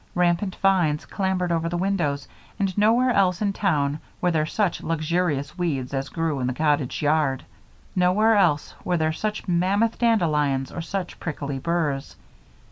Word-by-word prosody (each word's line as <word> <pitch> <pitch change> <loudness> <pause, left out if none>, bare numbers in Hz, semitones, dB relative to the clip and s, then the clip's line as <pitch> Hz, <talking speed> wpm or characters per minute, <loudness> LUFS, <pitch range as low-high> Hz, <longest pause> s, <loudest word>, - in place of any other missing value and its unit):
Rampant 180 +2 +1
vines 175 -6 +2
clambered 190 -3 -1
over 165 0 0
the 175 - -2
windows 170 -8 -1 0.3
and 195 -3 -1
nowhere 230 +5 +4
else 190 -5 +2
in 200 -2 0
town 150 -7 0 0.2
were 180 - +1
there 155 -2 +1
such 200 0 0
luxurious 160 -3 -1
weeds 140 -7 -2
as 135 0 -2
grew 165 -4 -1
in 125 - -1
the 125 - -2
cottage 150 -3 0
yard. 145 -3 +1 0.5
Nowhere 195 +5 +4
else 170 -8 +2
were 180 -1 0
there 160 -1 +1
such 210 +5 -3
mammoth 190 +6 +1
dandelions 150 - +1
or 170 - -5
such 180 +2 -5
prickly 140 -4 -4
burrs. 155 -3 -1
170 Hz, 155 wpm, -24 LUFS, 150-195 Hz, 0.5 s, nowhere